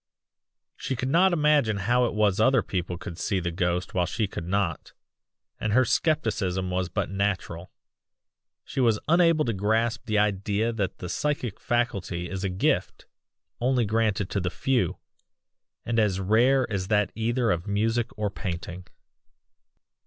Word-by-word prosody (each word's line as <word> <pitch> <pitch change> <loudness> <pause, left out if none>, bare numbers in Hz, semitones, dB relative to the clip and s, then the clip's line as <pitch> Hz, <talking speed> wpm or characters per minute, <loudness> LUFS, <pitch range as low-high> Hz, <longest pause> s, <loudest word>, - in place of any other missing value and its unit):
"She 135 - -3
could 130 +2 -2
not 180 +6 +4
imagine 150 -9 +3
how 120 +5 +2
it 115 - -3
was 105 -2 +2
other 130 +1 +4
people 90 -2 -3
could 85 -1 -8
see 100 -3 0
the 85 -1 -2
ghost 90 0 -1
while 90 -2 +1
she 110 - -1
could 85 -3 -6
not. 95 -3 -2 0.7
And 110 -1 -1
her 130 +2 +5
scepticism 100 - 0
was 90 0 -1
but 90 - -2
natural; 95 -3 -2 0.9
she - - -5
was 115 -4 +3
unable 165 -1 +4
to 115 - 0
grasp 110 +4 0
the 110 -1 +1
idea 105 +2 +1
that 100 -4 -2
the 90 - -6
psychic 130 - -2
faculty 100 -7 -1
is 95 0 -4
a 95 - 0
gift, 90 +1 -1 0.5
only 125 -1 +2
granted 105 -3 0
to 100 - 0
the 90 -1 -1
few, 130 +4 0 0.9
and 115 -1 +1
as 100 -3 +1
rare 120 +7 +3
as 95 -2 -2
that 105 -2 +2
either 115 +1 0
of 85 +3 -2
music 110 +3 0
or 105 -1 -1
painting. 90 -1 -6
105 Hz, 155 wpm, -26 LUFS, 95-120 Hz, 0.9 s, her